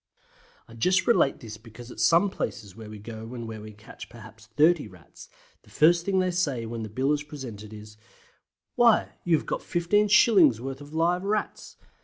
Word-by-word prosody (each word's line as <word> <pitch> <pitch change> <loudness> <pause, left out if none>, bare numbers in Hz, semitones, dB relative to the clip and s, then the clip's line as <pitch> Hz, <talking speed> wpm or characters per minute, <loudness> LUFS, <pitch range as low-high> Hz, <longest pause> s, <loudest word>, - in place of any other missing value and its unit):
I 115 - -15
just 180 +12 +1
relate 230 - +2
this 110 -2 -9
because 115 +2 -13
at - - -11
some 175 +4 +3
places 100 - -6
where 110 -1 -11
we 105 - -9
go 110 +3 -9
and 115 -2 -6
where 110 -1 -8
we 110 0 -10
catch 105 +3 -13
perhaps 110 -1 -14
30 165 +4 +3
Rats, - - -16 0.3
the - - -23
first 170 +2 +3
thing 195 -1 +1
they 185 -1 +1
say 145 -10 -1
when 115 0 -6
the 110 - -6
bill 130 +7 0
is 150 - -2
presented 125 -8 -9
is 105 0 -12 0.8
"Why, 235 -2 +3
you 170 -2 +3
have - - -7
got - - -3
15s. 190 - +3
worth 135 +2 -7
of 145 +2 -11
live 175 +3 +1
Rats!" 210 +2 -3
135 Hz, 190 wpm, -26 LUFS, 110-175 Hz, 0.8 s, some